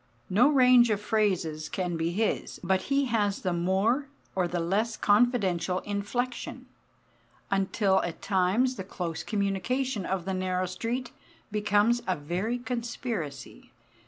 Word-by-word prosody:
No 235 +9 +5
range 250 -4 +6
of 210 -2 +1
phrases 190 -8 0
can 180 -2 -2
be 165 0 0
his, 215 +5 -1
but 190 +1 +2
he 275 0 +3
has 210 -5 0
the 180 -2 0
more 195 +11 +1 0.3
or 185 -2 +1
the 175 +1 -2
less 205 +7 0
confidential 205 -5 +2
inflection, 220 +5 -3 0.9
until 195 0 +2
at 170 -1 -4
times 200 +7 +1
the 190 - -4
close 170 -4 -4
communication 210 +4 -1
of 185 -3 -2
the 190 - -2
narrow 185 0 -1
street 235 +7 -3 0.4
becomes 210 +3 +2
a 185 - +2
very 180 +11 -2
conspiracy. 235 - -5
200 Hz, 130 wpm, -28 LUFS, 180-235 Hz, 0.9 s, range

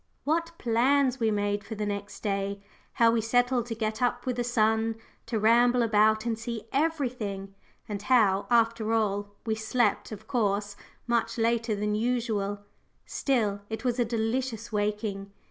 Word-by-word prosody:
What 330 +3 0
plans 260 +3 +2
we 225 -2 +2
made 205 -1 0
for 220 +2 -7
the 210 0 -3
next 200 0 -5
day 200 -1 -1 0.3
how 230 -1 +4
we 230 -1 +1
settled 245 +1 +1
to 230 - -4
get 215 0 -3
up 245 0 0
with 250 -1 -2
the 245 - 0
sun, 225 -1 +1 0.3
to 230 -1 -1
ramble 240 +3 +4
about 215 0 +3
and 225 -2 -1
see 230 -1 -5
everything 250 -10 -1 0.3
and 205 -2 -4
how, 205 -4 +3
after 230 -2 +2
all, 205 -2 -1
we 220 - 0
slept, 220 +1 0
of 215 0 -9
course, 205 -4 0 0.3
much 235 -1 0
later 230 -1 +1
than 210 +1 -1
usual! 215 -3 -1 0.4
Still, 215 -7 0
it 220 +2 -5
was 245 0 0
a - - +4
delicious 230 0 -2
waking. 205 -1 -2
225 Hz, 160 wpm, -28 LUFS, 210-240 Hz, 0.4 s, how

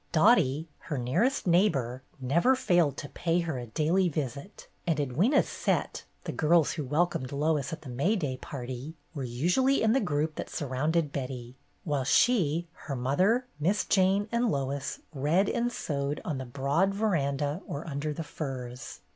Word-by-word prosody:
Dottie, 160 - +4 0.2
her 150 - -1
nearest 170 - +1
neighbor, 155 - +2 0.2
never 170 - +3
failed 175 - +2
to 145 - -6
pay 170 0 0
her 160 -6 -3
a 120 - -7
daily 165 - +2
visit, 145 - -5 0.2
and 165 - +2
Edwyna's 155 - +2
"set,'' - - -1 0.2
the - - -3
girls 160 0 +3
who 155 - -3
welcomed 145 -2 0
Lois 150 +2 0
at 160 -1 -6
the 135 - -8
May 140 - +1
day 145 -10 -2
party, 130 +3 -6 0.2
were 140 -4 -4
usually 180 - +2
in 220 0 +4
the 270 - +4
group 155 -4 -1
that - - -4
surrounded 150 +3 0
Betty, 125 -3 -5 0.3
while 145 -6 0
she, 170 - +3
her 140 -3 -6
mother. 185 - +2
Miss 185 +8 +1
Jane, 195 +1 +3
and 235 0 +2
Lois 140 -1 -2
read 155 +8 +2
and 240 +3 0
sewed 140 -8 -2
on 150 -6 -2
the 130 - -5
broad 145 +10 +1
veranda 150 -6 0
or 145 +4 -5
under 150 0 -2
the 160 +2 -4
firs. 130 -5 -6
150 Hz, 165 wpm, -29 LUFS, 135-180 Hz, 0.3 s, Dottie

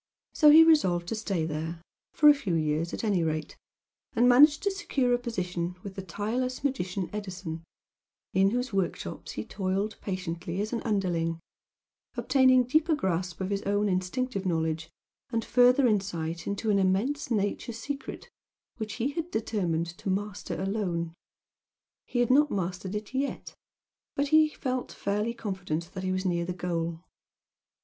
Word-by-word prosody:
So 300 - +6
he 315 +2 +10
resolved 185 - +3
to - - -1
stay 195 -7 -1
there, 160 +2 -4 0.3
for 300 - +4
a 295 - +10
few 205 -12 -2
years 155 +1 0
at - - -5
any 200 -6 +2
rate, 155 -1 -2 0.6
and 240 +1 +5
managed 290 +5 +6
to 400 - +2
secure 275 -10 0
a 245 - +2
position 180 -7 -3
with 200 - -7
the 195 - -5
tireless 225 +8 -3
magician 190 -9 -1
Edison, 185 -5 -5 0.7
in 195 +1 +4
whose 245 +1 -2
workshops 195 -3 -3
he 105 - -5
toiled 195 +2 -2
patiently 180 -2 -4
as 215 +3 -2
an 230 - -1
underling, 175 -6 0 0.8
obtaining 260 -2 +5
deeper 310 +6 +2
grasp 180 - -2
of 190 +1 -2
his 200 0 0
own 205 +1 +1
instinctive 195 +4 -1
knowledge, 160 -3 -1 0.4
and 230 -2 -1
further 250 +2 +5
insight 175 -7 -1
into 200 +2 -1
an 200 - +3
immense 200 +11 +1
nature 210 +1 -1
secret 275 +5 -6 0.5
which 220 -2 -4
he 255 +3 -1
had 330 +3 -4
determined 190 - -1
to - - -4
master 200 +1 -3
alone. 185 -4 -2 0.9
He 245 - 0
had 245 - +2
not 295 +3 +5
mastered 185 0 -3
it 210 +3 -5
yet 275 +2 -3 0.6
but 280 0 0 0.3
felt 255 -2 -2
fairly 210 +4 -2
confident 180 -6 -4
that 190 - -5
he 185 - 0
was 185 +1 -1
near 170 -2 +1
the 180 +1 -3
goal. 170 -2 -3
200 Hz, 155 wpm, -28 LUFS, 175-245 Hz, 0.9 s, he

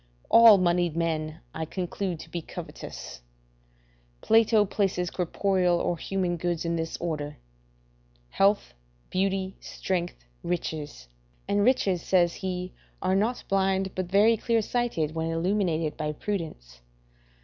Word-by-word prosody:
All 230 -3 +9
moneyed 175 -2 +1
men 160 -1 -2
I 160 - -3
conclude 180 0 -3
to - - -12
be 170 - -3
covetous. - - -8 1.0
Plato 225 -1 +4
places 185 -3 -1
corporal 180 0 +1
or 175 - 0
human 180 0 -2
goods 175 0 -2
in 170 0 0
this 165 0 -3
order: 150 -3 -4 0.9
health, 200 - +2 0.4
beauty, 190 0 -1
strength, 175 - -4 0.2
riches; 155 - -4 0.4
and 205 0 +2
riches, 200 -7 +2
says 175 -2 +3
he, 185 -1 -4 0.3
are 185 +1 +2
not 220 +5 0
blind, 190 0 +1
but 185 -1 -3
very 210 +5 +4
clear 230 0 +1
sighted, 210 -11 -1
when 160 0 -2
illuminated 165 -2 0
by 150 -1 -2
prudence. 150 - -5
180 Hz, 125 wpm, -27 LUFS, 165-195 Hz, 1.0 s, All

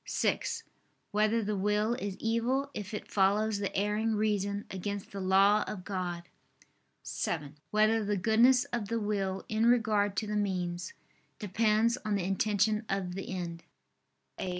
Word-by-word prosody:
(6) - - -1 0.5
Whether 215 +2 +2
the 210 +1 -1
will 210 +3 +1
is 205 -6 -4
evil 245 +5 0
if 205 -1 -6
it 210 - -5
follows 205 +2 +2
the 200 - -3
erring 210 +2 +1
reason 205 -1 0
against 200 +1 -4
the 200 - -5
law 195 +3 +4
of 185 -3 -5
God? 180 -3 -3 0.8
(7) 150 -3 -3
Whether 215 +1 +3
the 205 0 0
goodness 235 +6 +5
of 230 -4 -1
the 230 +2 -1
will 195 -3 -2
in 220 +1 +1
regard 215 -4 +3
to 220 - 0
the 210 0 -3
means, 180 -3 -2 0.4
depends 220 +3 +2
on 215 -2 0
the 195 - -1
intention 210 +3 +1
of 195 -2 -2
the 195 +1 -6
end? 170 -2 -4
210 Hz, 150 wpm, -30 LUFS, 195-220 Hz, 0.8 s, goodness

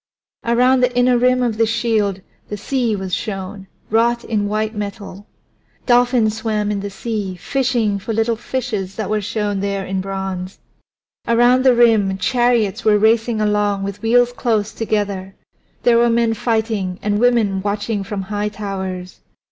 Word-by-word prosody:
Around 250 +2 +3
the 250 0 +1
inner 245 0 +4
rim 250 +1 +3
of 230 -3 -1
the 225 0 +3
shield 215 -4 0 0.3
the 210 - -4
sea 240 0 -1
was 190 -2 -5
shown, 195 0 -4 0.2
wrought 235 +2 +2
in 210 -2 -1
white 215 +1 -1
metal. 205 -1 -7 0.6
Dolphins 240 -3 +3
swam 215 -2 -1
in 205 - -2
the 200 +1 -4
sea, 205 -2 -4
fishing 225 +1 0
for 210 - -5
little 225 +1 +1
fishes 220 -5 -4
that 215 -2 -4
were 215 0 +1
shown 205 -1 -2
there 200 -1 -2
in 190 0 -2
bronze. 190 -1 -5 0.7
Around 240 +2 +4
the 260 -2 +5
rim 220 -5 +3
chariots 240 -1 +1
were 215 -1 +4
racing 225 +1 +2
along 210 -1 +1
with 200 0 -5
wheels 240 +2 +3
running 245 - -16
close 220 -3 0
together; 200 -4 -2 0.5
there 235 -1 +4
were 235 0 +4
men 230 -1 +2
fighting 220 -5 -1
and 205 0 0
women 225 -5 +2
watching 205 +1 -2
from 195 0 -4
high 205 +1 -2
towers. 190 -3 -6
215 Hz, 160 wpm, -19 LUFS, 200-235 Hz, 0.7 s, the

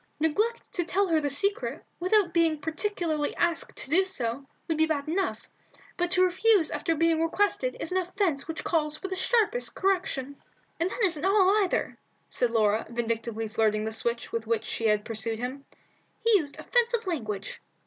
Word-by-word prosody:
"Neglect 425 +10 0
to 355 - 0
tell 390 +4 +1
her 320 -2 +3
the 290 - 0
secret, 400 - 0
without 370 0 +2
being 330 -2 +3
particularly 320 -1 -2
asked 340 -1 -1
to - - -6
do 370 +4 +5
so, 275 -8 -3 0.2
would 325 - 0
be 315 +1 +3
bad 290 -2 -1
enough, 375 +5 -2 0.5
but 355 0 0
to 365 +1 +4
refuse 375 -1 +3
after 310 +2 -1
being 325 0 +2
requested 410 +8 0
is 325 - -4
an 375 - +2
offence 360 -5 -1
which 325 -1 -5
calls 305 -2 0
for 385 - -6
the 380 - -2
sharpest 450 +4 +1
correction." 360 -8 -1 0.4
"And 340 +2 +1
that 460 - -2
isn't 330 -6 +2
all, 390 0 +4
either," 370 - -2 0.3
said 245 - +1
Laura, 220 -1 +2
vindictively 230 -1 -2
flirting 215 -1 +1
the 220 - -2
switch 235 +1 -3
with 230 -1 -3
which 225 -1 0
she 225 - -1
had 210 -1 +2
pursued 225 0 -2
him. 255 +4 -5 0.5
"He 460 - +2
used 285 -4 -6
offensive 475 -2 +1
language." 215 - -4
325 Hz, 180 wpm, -27 LUFS, 245-380 Hz, 0.5 s, do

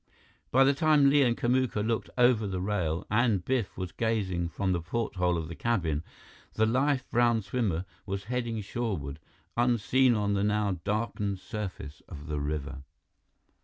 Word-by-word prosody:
By 135 +2 +5
the 135 +1 +4
time 145 -1 +4
Li 145 0 +5
and 120 -3 +2
Kamuka 120 -3 +1
looked 115 0 -1
over 120 -4 +4
the 95 -2 -3
rail 90 -4 -1
and 105 -5 +2
Biff 125 -6 -1
was 90 -1 -4
gazing 95 -7 -1
from 95 +2 -1
the 85 -2 0
porthole 90 -2 -1
of 80 -1 -3
the 85 - -7
cabin, 85 -9 -1 0.5
the 110 - +3
lithe 130 +3 +2
brown 120 -2 +3
swimmer 95 -5 -1 0.2
was 100 0 -3
heading 120 -2 -2
shoreward, 95 - -3 0.4
unseen 120 +1 +3
on 100 -1 0
the 100 0 +1
now 105 -3 0
darkened 105 -1 -1
surface 95 - -6
of 75 -4 -9
the 75 -2 -3
river. 70 -2 -4
105 Hz, 160 wpm, -29 LUFS, 90-120 Hz, 0.5 s, By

